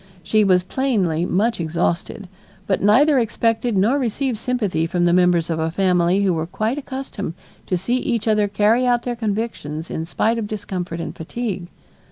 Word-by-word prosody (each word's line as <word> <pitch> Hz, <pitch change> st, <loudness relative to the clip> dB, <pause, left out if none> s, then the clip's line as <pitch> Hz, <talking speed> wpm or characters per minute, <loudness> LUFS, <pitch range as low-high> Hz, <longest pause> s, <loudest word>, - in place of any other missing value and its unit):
She 215 Hz, +5 st, +3 dB
was 185 Hz, -2 st, +3 dB
plainly 185 Hz, -, 0 dB
much 215 Hz, +5 st, +1 dB
exhausted, 170 Hz, +4 st, -2 dB, 0.4 s
but 190 Hz, -, 0 dB
neither 265 Hz, +8 st, +5 dB
expected 230 Hz, -1 st, 0 dB
nor 230 Hz, +9 st, +3 dB
received 250 Hz, -1 st, -1 dB
sympathy 210 Hz, -10 st, -1 dB
from 175 Hz, +1 st, 0 dB
the 175 Hz, -, +3 dB
members 180 Hz, -2 st, +3 dB
of 160 Hz, -, -1 dB
a 160 Hz, 0 st, 0 dB
family 180 Hz, +1 st, +2 dB
who 190 Hz, -2 st, +2 dB
were 160 Hz, 0 st, -2 dB
quite 220 Hz, +9 st, -2 dB
accustomed 260 Hz, -, -6 dB, 0.3 s
to 185 Hz, -, 0 dB
see 235 Hz, +8 st, 0 dB
each 235 Hz, -3 st, -2 dB
other 210 Hz, -1 st, +3 dB
carry 215 Hz, +5 st, +2 dB
out 240 Hz, -1 st, +2 dB
their 245 Hz, -1 st, -2 dB
convictions 205 Hz, -8 st, -3 dB
in 160 Hz, +1 st, -4 dB
spite 225 Hz, +6 st, 0 dB
of 215 Hz, -, -3 dB
discomfort 185 Hz, -5 st, -4 dB
and 165 Hz, -, -5 dB
fatigue. 190 Hz, +1 st, -4 dB
205 Hz, 175 wpm, -21 LUFS, 175-235 Hz, 0.4 s, neither